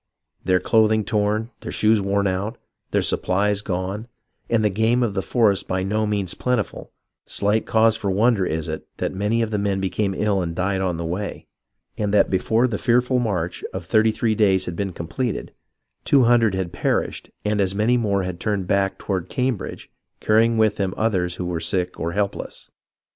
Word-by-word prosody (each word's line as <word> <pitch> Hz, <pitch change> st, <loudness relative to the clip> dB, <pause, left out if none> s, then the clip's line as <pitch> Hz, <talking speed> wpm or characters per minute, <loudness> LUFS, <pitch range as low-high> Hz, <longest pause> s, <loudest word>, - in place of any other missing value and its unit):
Their 90 Hz, -1 st, +3 dB
clothing 110 Hz, 0 st, +3 dB
torn, 105 Hz, +2 st, 0 dB
their -, -, -7 dB
shoes 110 Hz, -1 st, +3 dB
worn 100 Hz, +1 st, 0 dB
out, 100 Hz, +5 st, -2 dB, 0.3 s
their -, -, +1 dB
supplies 100 Hz, +2 st, +1 dB
gone, 95 Hz, +3 st, -3 dB, 0.4 s
and 115 Hz, -2 st, +2 dB
the 105 Hz, -, +3 dB
game 110 Hz, +5 st, +2 dB
of 110 Hz, -4 st, -1 dB
the 95 Hz, -, -1 dB
forest 105 Hz, -3 st, +1 dB
by 95 Hz, 0 st, -1 dB
no 105 Hz, +3 st, 0 dB
means 100 Hz, -4 st, 0 dB
plentiful, 125 Hz, -7 st, -2 dB, 0.4 s
slight 105 Hz, +2 st, +1 dB
cause 110 Hz, 0 st, +4 dB
for 100 Hz, -, -3 dB
wonder 105 Hz, +1 st, +3 dB
is 80 Hz, -3 st, -2 dB
it 80 Hz, 0 st, -5 dB
that -, -, -2 dB
many 105 Hz, +4 st, 0 dB
of 110 Hz, -, -3 dB
the 105 Hz, -, 0 dB
men 100 Hz, -1 st, 0 dB
became 95 Hz, +1 st, -1 dB
ill 100 Hz, -2 st, +1 dB
and 85 Hz, -2 st, -3 dB
died 95 Hz, +1 st, 0 dB
on 90 Hz, -3 st, -1 dB
the 85 Hz, -, -4 dB
way, 90 Hz, +5 st, -4 dB, 0.5 s
and 105 Hz, -1 st, 0 dB
that -, -, +4 dB
before 110 Hz, +6 st, +2 dB
the 105 Hz, -5 st, -3 dB
fearful 125 Hz, +1 st, +2 dB
march 90 Hz, -7 st, -2 dB
of 90 Hz, -2 st, -5 dB
thirty 110 Hz, +3 st, +3 dB
three 110 Hz, +1 st, 0 dB
days 100 Hz, -3 st, +3 dB
had 90 Hz, -, -5 dB
been 100 Hz, +1 st, -2 dB
completed, 85 Hz, -, -4 dB, 0.5 s
two 140 Hz, -3 st, +4 dB
hundred 115 Hz, -4 st, +4 dB
had 90 Hz, -2 st, -3 dB
perished -, -, -1 dB, 0.2 s
and 105 Hz, 0 st, +1 dB
as 95 Hz, 0 st, 0 dB
many 110 Hz, +4 st, +2 dB
more 100 Hz, -5 st, +1 dB
had 90 Hz, -1 st, -5 dB
turned 100 Hz, -3 st, -1 dB
back 95 Hz, +1 st, +1 dB
toward 95 Hz, -3 st, -3 dB
Cambridge, 125 Hz, -4 st, -3 dB, 0.3 s
carrj 110 Hz, +1 st, +4 dB
ing 115 Hz, 0 st, 0 dB
with 110 Hz, -1 st, +3 dB
them 95 Hz, -2 st, -1 dB
others 90 Hz, -5 st, 0 dB
w^ho 90 Hz, -, -3 dB
were 90 Hz, -2 st, -2 dB
sick 90 Hz, +2 st, -2 dB
or 85 Hz, +1 st, -2 dB
helpless. 100 Hz, 0 st, -3 dB
100 Hz, 190 wpm, -22 LUFS, 95-110 Hz, 0.5 s, cause